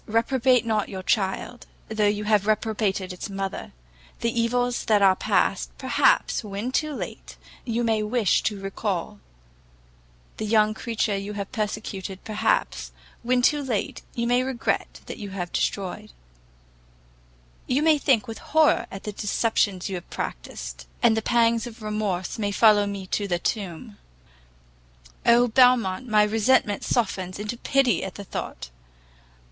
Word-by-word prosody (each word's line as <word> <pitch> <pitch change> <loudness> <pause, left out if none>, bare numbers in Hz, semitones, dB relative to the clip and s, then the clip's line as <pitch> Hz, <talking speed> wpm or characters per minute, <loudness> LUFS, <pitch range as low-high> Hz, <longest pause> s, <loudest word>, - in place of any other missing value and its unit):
reprobate 245 +2 +2
not 215 -2 0
your 190 -1 -6
child, 205 +4 -1 0.2
though 215 -1 +1
you 205 0 0
have 210 -1 +2
reprobated 210 -3 0
its 180 - -7
mother. 195 - -4 0.5
The 230 - +1
evils 245 +1 0
that 210 -2 +3
are 190 -1 +6
past, - - +1
perhaps, - - +2
when 210 +4 -4
too 305 +2 0
late, - - -7 0.3
you 235 +1 -1
may 225 -2 +1
wish 215 -2 +2
to 205 -2 -8
recal; 195 - -3 1.2
the 220 - -3
young 215 0 +3
creature 225 -2 -1
you 200 +1 -4
have 200 -1 -5
persecuted, 210 -4 -4
perhaps, 215 -1 0 0.3
when 245 +1 +1
too 295 +3 +3
late, 245 -7 -2
you 235 - -1
may 245 +1 +3
regret 255 -1 -2
that - - -8
you 205 - -6
have 180 -3 -5
destroyed; 205 +2 -2 1.6
you 270 +4 +1
may 310 -2 +4
think 255 -4 +2
with 225 - -7
horror 315 -1 +3
of 195 - -8
the 210 - -4
deceptions 205 -2 0
you 195 - -5
have 175 - -11
practised, - - -6 0.2
and 230 -2 +5
the 220 - 0
pangs 230 0 +2
of 230 -1 -11
remorse 210 -3 -2
may 205 -1 0
follow 205 -1 +5
me 200 -1 -5
to 200 +2 -2
the 175 -2 0
tomb: 200 +2 -4 1.3
Oh, 240 +1 +6
Belmont, 245 -4 +4
all 240 - -10
my 210 -1 +6
resentment 215 0 +2
softens 190 -6 -1
into 210 +3 -4
pity 255 -4 +2
at 190 - -6
the 200 - -7
thought! 60 - -6
215 Hz, 150 wpm, -25 LUFS, 195-235 Hz, 1.6 s, are